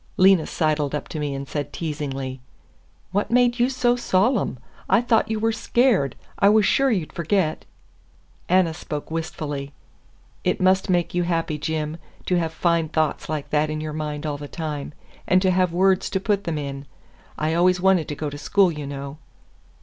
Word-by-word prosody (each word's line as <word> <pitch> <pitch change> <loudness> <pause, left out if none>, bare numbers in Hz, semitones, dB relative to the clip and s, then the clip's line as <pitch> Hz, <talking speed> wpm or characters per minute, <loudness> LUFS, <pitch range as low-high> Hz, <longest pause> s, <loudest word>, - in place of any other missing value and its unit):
Lena 185 -3 +5
sidled 150 -3 0
up 150 - -4
to 155 - -5
me 145 -2 -2
and 135 0 -5
said 145 0 -4
teasingly: 135 -5 -4 0.7
"What 200 +2 0
made 245 0 +3
you 245 +2 +3
so 250 -2 +2
solemn? 230 - +1 0.3
I - - +5
thought 230 -2 +2
you 220 -1 -1
were 225 +1 +2
scared. 225 - +2 0.2
I 200 - +6
was 215 -1 +5
sure 270 +6 +3
you'd 185 -10 -1
forget." 170 -1 0 0.8
Anna 180 -2 +3
spoke 155 -2 -6
wistfully. 145 -3 -4 0.7
"It - - 0
must 190 +2 +3
make 175 -2 +1
you 175 - +1
happy, 165 -3 -1
Jim, 155 +1 -2 0.3
to 180 -1 +2
have 165 -2 -1
fine 165 -1 +1
thoughts 155 -2 -1
like 155 -2 -4
that 150 0 +2
in 155 0 -3
your 155 0 -4
mind 150 -1 -4
all 145 -2 -3
the 145 - -7
time, 150 -2 -5 0.3
and 185 - +5
to 190 - +3
have 185 -1 +2
words 190 +2 +2
to 190 - -1
put 200 0 0
them 165 -3 -2
in. 140 -1 -5 0.5
I 155 +1 0
always 180 +2 +3
wanted 185 -3 +3
to 150 - -4
go 145 0 -4
to 145 - -7
school, 190 +4 +3
you 150 -3 -6
know." 140 +1 -7
165 Hz, 185 wpm, -23 LUFS, 150-190 Hz, 0.8 s, I